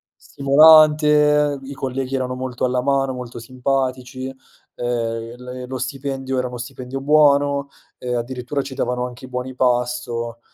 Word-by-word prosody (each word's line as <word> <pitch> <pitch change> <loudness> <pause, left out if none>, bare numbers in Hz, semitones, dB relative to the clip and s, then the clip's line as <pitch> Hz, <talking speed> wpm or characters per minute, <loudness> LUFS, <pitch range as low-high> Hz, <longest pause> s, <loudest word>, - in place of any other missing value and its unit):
stimolante, 150 0 +5
i 140 +1 -7
colleghi 135 0 -3
erano 130 -1 -2
molto 130 -1 -5
alla 125 0 0
mano, 135 -1 +1
molto 125 -2 -7
simpatici, 130 +1 -2
ehm, 120 -3 -5 0.2
il 125 0 -6
lo 130 0 -4
stipendio 135 0 -3
era 125 - -1
uno 125 0 -7
stipendio 125 +2 -6
buono 140 -1 +3 0.3
e 125 -1 -3
addirittura 125 +3 -3
ci 135 0 -8
davano 125 -2 -1
anche 125 +1 -11
i 130 - -12
buoni 125 +1 -4
pasto, 120 -2 -1
130 Hz, 140 wpm, -21 LUFS, 125-140 Hz, 0.3 s, stimolante